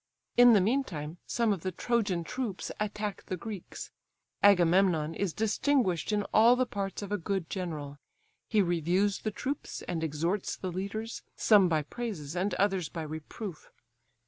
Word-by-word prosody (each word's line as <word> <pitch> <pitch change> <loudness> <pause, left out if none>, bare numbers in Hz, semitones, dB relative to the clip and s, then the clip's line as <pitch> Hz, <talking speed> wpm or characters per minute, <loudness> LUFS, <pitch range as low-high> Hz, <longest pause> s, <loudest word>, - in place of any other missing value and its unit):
In 245 -1 +8
the 205 - +6
meantime 180 - -1
some 230 -3 +2
of 190 - -5
the 185 - -2
Trojan 200 -3 0
troops 240 -1 -4
attack 210 -1 -3
the 185 - -3
Greeks. 200 0 -7 0.5
Agamemnon 175 -4 +4
is 190 +2 -1
distinguished 220 - +1
in 210 -1 +1
all 230 +3 +7
the 255 0 +2
parts 200 -3 -4
of 200 - -7
a 205 - 0
good 190 0 -3
general; 150 -6 -4 0.5
he 215 -3 +4
reviews 175 +4 +1
the 215 - -2
troops, 265 +7 -4
and 165 -2 -3
exhorts 165 +6 -1
the 185 - -5
leaders, 200 +5 -4
some 200 -5 +5
by 155 -2 +1
praises 180 -6 -5
and 185 +1 0
others 190 -4 +1
by 165 - -5
reproof. 155 +4 -7
195 Hz, 155 wpm, -30 LUFS, 170-215 Hz, 0.5 s, In